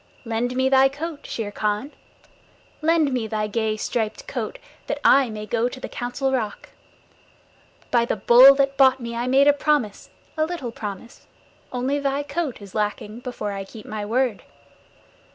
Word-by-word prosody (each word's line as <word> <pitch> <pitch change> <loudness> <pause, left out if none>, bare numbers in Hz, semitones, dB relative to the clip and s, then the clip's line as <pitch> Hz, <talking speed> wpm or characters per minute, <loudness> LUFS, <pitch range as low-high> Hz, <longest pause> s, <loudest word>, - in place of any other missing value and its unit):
Lend 235 +2 -2
me 260 +1 +2
thy 265 0 +5
coat, 295 +2 -7
Shere 215 -3 -4
Khan. 210 +7 -2 0.9
Lend 315 -3 +2
me 240 -3 -1
thy 215 -1 -1
gay 215 0 -1
striped 220 0 -3
coat - - -4 0.3
that - - -2
I 270 -3 +6
may 215 -1 -6
go 235 +2 0
to 260 - -9
the - - -6
Council 255 +2 -3
Rock. 220 -6 -3 1.2
By 235 -1 +3
the - - -1
Bull 245 +6 +8
that 275 0 +1
bought 265 -1 +5
me 235 -1 -6
I 240 +1 -2
made 270 +2 +4
a 290 - +7
promise 285 -8 -1 0.3
a 310 - +1
little 320 -9 -5
promise. 210 +1 -8 0.4
Only 260 +3 -1
thy 280 0 -1
coat 290 -5 -4
is 200 - -12
lacking 210 +1 -3
before 245 -4 -5
I 195 -1 -4
keep 215 +2 -12
my 215 -1 -5
word. 235 +1 0
245 Hz, 170 wpm, -23 LUFS, 215-275 Hz, 1.2 s, Bull